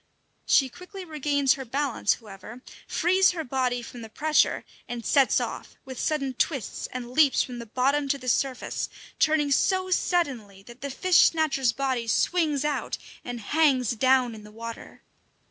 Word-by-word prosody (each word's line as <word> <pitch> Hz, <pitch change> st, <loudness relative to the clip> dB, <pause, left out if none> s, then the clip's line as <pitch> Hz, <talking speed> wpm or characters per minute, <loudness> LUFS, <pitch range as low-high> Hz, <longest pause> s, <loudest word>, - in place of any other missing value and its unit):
She 270 Hz, -, +4 dB
quickly 365 Hz, +7 st, -10 dB
regains 285 Hz, -4 st, +1 dB
her 270 Hz, -, -6 dB
balance, 265 Hz, -3 st, 0 dB
however, 220 Hz, +3 st, -12 dB, 0.2 s
frees 370 Hz, +2 st, +3 dB
her 330 Hz, -2 st, -4 dB
body 250 Hz, -2 st, -1 dB
from 240 Hz, +1 st, -10 dB
the 225 Hz, -, -9 dB
pressure, 305 Hz, +7 st, +1 dB, 0.2 s
and 235 Hz, -2 st, -6 dB
sets 275 Hz, -2 st, +4 dB
off, -, -, -6 dB
with 260 Hz, -2 st, -8 dB
sudden 275 Hz, -4 st, -1 dB
twists, 260 Hz, -, -2 dB
and 245 Hz, -1 st, -6 dB
leaps 285 Hz, 0 st, +4 dB
from 245 Hz, -2 st, -7 dB
the 235 Hz, -, -8 dB
bottom 275 Hz, +5 st, +1 dB
to 280 Hz, +1 st, 0 dB
the 255 Hz, -2 st, -11 dB
surface, 255 Hz, +1 st, -1 dB, 0.3 s
turning 305 Hz, -2 st, +2 dB
so 370 Hz, +6 st, +2 dB
suddenly 255 Hz, -, -1 dB
that 240 Hz, +4 st, -14 dB
the 280 Hz, -, -4 dB
fish 360 Hz, +6 st, +3 dB
snatcher's 295 Hz, -6 st, +3 dB
body 260 Hz, -3 st, -2 dB
swings 300 Hz, +3 st, +1 dB
out 300 Hz, -1 st, -2 dB, 0.3 s
and 245 Hz, -1 st, -6 dB
hangs 265 Hz, -1 st, +2 dB
down 255 Hz, 0 st, +2 dB
in 215 Hz, -1 st, -11 dB
the 210 Hz, -, -12 dB
water. 230 Hz, +1 st, -9 dB
265 Hz, 165 wpm, -26 LUFS, 240-300 Hz, 0.3 s, She